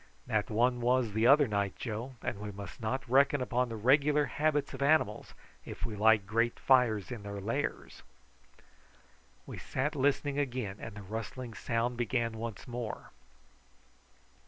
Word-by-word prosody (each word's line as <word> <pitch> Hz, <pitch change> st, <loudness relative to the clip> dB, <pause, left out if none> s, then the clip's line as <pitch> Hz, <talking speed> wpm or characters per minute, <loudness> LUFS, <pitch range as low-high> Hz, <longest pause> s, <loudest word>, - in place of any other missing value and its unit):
"That 110 Hz, -3 st, 0 dB
one 120 Hz, +3 st, +2 dB
was 120 Hz, -2 st, +2 dB
the 110 Hz, +2 st, +3 dB
other 145 Hz, +1 st, +6 dB
night, 100 Hz, -3 st, -1 dB
Joe, 120 Hz, +3 st, -5 dB
and 100 Hz, -, -3 dB
we 105 Hz, 0 st, -5 dB
must 100 Hz, +2 st, -9 dB
not 130 Hz, +4 st, -2 dB
reckon 140 Hz, +3 st, +4 dB
upon 125 Hz, 0 st, 0 dB
the 115 Hz, -, -5 dB
regular 145 Hz, +6 st, +3 dB
habits 150 Hz, +2 st, 0 dB
of 135 Hz, -, -7 dB
animals 140 Hz, -7 st, +1 dB, 0.3 s
if -, -, -6 dB
we 110 Hz, -, -4 dB
light 110 Hz, -1 st, +4 dB
great 115 Hz, +3 st, 0 dB
fires 125 Hz, -6 st, +3 dB
in 120 Hz, -4 st, -5 dB
their 100 Hz, 0 st, -6 dB
lairs." 115 Hz, +9 st, -3 dB, 1.4 s
We -, -, -8 dB
sat 150 Hz, +4 st, -2 dB
listening 145 Hz, +1 st, +1 dB
again, 125 Hz, -8 st, -2 dB
and 110 Hz, -2 st, -8 dB
the 105 Hz, -, -8 dB
rustling 115 Hz, +4 st, -6 dB
sound 115 Hz, +3 st, -1 dB
began 120 Hz, -1 st, 0 dB
once 115 Hz, -3 st, -6 dB
more. 120 Hz, -2 st, -6 dB
120 Hz, 155 wpm, -31 LUFS, 110-130 Hz, 1.4 s, other